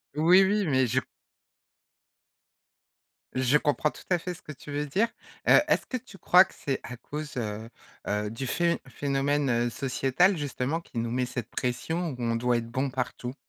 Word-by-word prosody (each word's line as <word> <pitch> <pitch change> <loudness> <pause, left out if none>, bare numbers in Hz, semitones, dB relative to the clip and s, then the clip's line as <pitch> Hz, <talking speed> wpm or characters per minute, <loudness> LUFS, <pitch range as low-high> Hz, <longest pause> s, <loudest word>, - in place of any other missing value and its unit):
Oui, 175 +5 +6
oui 205 +1 +2
mais 130 -5 +2
je - - +2 2.3
je 130 +2 +3
comprends 150 0 +1
tout - - -13
à 180 - +4
fait 180 +2 -4
ce - - -14
que - - -9
tu 145 0 -10
veux 145 +1 -1
dire. 195 +11 +1 0.4
Heu, - - +9
est-ce - - +2
que 255 - -2
tu 230 -5 -13
crois 185 0 +6
que - - -17
c'est 135 -2 -2
à 125 - -7
cause, 150 +4 -6
heu, 110 -1 -4 0.4
heu, 105 0 -1
du 115 +5 -5
phén 170 +6 +1
phénomène 135 -3 0
sociétal, 135 - +2
justement, 145 +1 -2
qui 130 - -11
nous 115 0 -2
met 125 +1 0
cette 125 -1 -5
pression 160 +8 -2
où - - -7
on 115 -1 0
doit 120 +1 +2
être 115 0 -4
bon 130 +3 0
partout? 125 0 -4
135 Hz, 180 wpm, -28 LUFS, 125-160 Hz, 2.3 s, Heu